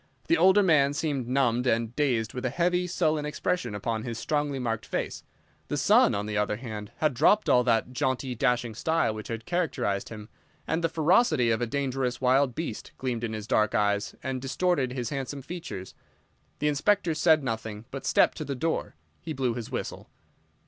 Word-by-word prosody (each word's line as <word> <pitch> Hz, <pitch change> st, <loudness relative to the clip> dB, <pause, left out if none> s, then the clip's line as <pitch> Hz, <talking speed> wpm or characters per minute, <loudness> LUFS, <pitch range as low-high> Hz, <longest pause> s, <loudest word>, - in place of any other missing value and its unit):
The 335 Hz, -, +4 dB
older 195 Hz, -2 st, +5 dB
man 145 Hz, -6 st, +4 dB
seemed 145 Hz, -6 st, -2 dB
numbed 125 Hz, -1 st, +1 dB
and 115 Hz, 0 st, 0 dB
dazed 120 Hz, -7 st, 0 dB
with 125 Hz, -, -5 dB
a 130 Hz, -, +1 dB
heavy, 180 Hz, +5 st, +1 dB
sullen 155 Hz, -4 st, 0 dB
expression 150 Hz, -, -2 dB
upon 110 Hz, +2 st, -2 dB
his 115 Hz, 0 st, -5 dB
strongly 145 Hz, +1 st, -1 dB
marked 115 Hz, -4 st, -3 dB
face. -, -, -3 dB, 0.4 s
The -, -, -2 dB
son, -, -, +4 dB
on 100 Hz, +1 st, -2 dB
the 105 Hz, -1 st, -1 dB
other 105 Hz, 0 st, 0 dB
hand, 105 Hz, -3 st, -7 dB
had 155 Hz, -2 st, +1 dB
dropped 205 Hz, -, +3 dB
all 125 Hz, -, +5 dB
that 115 Hz, 0 st, +2 dB
jaunty, 130 Hz, 0 st, -1 dB
dashing 120 Hz, -2 st, 0 dB
style 160 Hz, 0 st, +1 dB
which 110 Hz, 0 st, -7 dB
had 115 Hz, 0 st, -5 dB
characterized 160 Hz, -, -1 dB
him, 105 Hz, -2 st, -9 dB, 0.4 s
and 165 Hz, +1 st, -1 dB
the 165 Hz, -, +2 dB
ferocity 155 Hz, -, +3 dB
of 110 Hz, -, 0 dB
a 120 Hz, -, 0 dB
dangerous 130 Hz, -1 st, -1 dB
wild 130 Hz, 0 st, +3 dB
beast 160 Hz, -9 st, -5 dB
gleamed 125 Hz, -3 st, -3 dB
in 110 Hz, -2 st, -2 dB
his 110 Hz, -1 st, -5 dB
dark 110 Hz, -2 st, +2 dB
eyes 105 Hz, -1 st, +1 dB
and 130 Hz, -1 st, -3 dB
distorted 135 Hz, -1 st, 0 dB
his 125 Hz, -3 st, -3 dB
handsome 135 Hz, 0 st, -4 dB
features. 150 Hz, -, -7 dB, 0.6 s
The 150 Hz, -, 0 dB
Inspector 170 Hz, +4 st, +2 dB
said 155 Hz, -1 st, +4 dB
nothing, 110 Hz, -3 st, -4 dB
but, 135 Hz, -, -6 dB
stepping -, -, +3 dB
to 155 Hz, -, -4 dB
the 140 Hz, -1 st, -3 dB
door, 160 Hz, -, -2 dB, 0.3 s
he 160 Hz, -, -5 dB
blew 130 Hz, -4 st, 0 dB
his 115 Hz, -2 st, -6 dB
whistle. -, -, -5 dB
130 Hz, 190 wpm, -27 LUFS, 115-155 Hz, 0.6 s, older